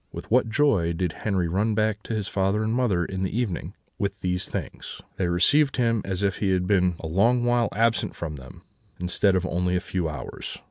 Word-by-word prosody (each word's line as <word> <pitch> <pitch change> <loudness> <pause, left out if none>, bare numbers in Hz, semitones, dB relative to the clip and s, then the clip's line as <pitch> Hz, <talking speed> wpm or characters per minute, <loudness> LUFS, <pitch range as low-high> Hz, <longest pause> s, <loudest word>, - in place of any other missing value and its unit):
With - - -9
what 120 -1 +4
joy 110 - +2
did 90 0 -1
Henri 95 -5 -1
run 105 +6 0
back 110 -1 +1
to 115 - -3
his 105 -3 -2
father 100 +2 0
and 110 +1 0
mother, 110 -9 +1
in 95 +1 -4
the 95 +3 -2
evening, 115 -8 -2 0.2
with 100 -1 -2
these 90 0 -2
things! - - -6 0.2
They 90 - 0
received 135 - +3
him 115 -3 +2
as 95 0 -3
if 100 0 +1
he 100 - 0
had 90 -1 +1
been 90 -2 +2
a - - -7
long 115 +9 +3
while 120 -1 +2
absent 115 +4 +1
from 75 -3 -5
them, 65 -2 -13 0.4
instead 90 +2 +2
of 90 0 +1
only 90 0 0
a - - +2
few 90 -3 -2
hours. 65 -5 -7
95 Hz, 215 wpm, -25 LUFS, 90-110 Hz, 0.4 s, what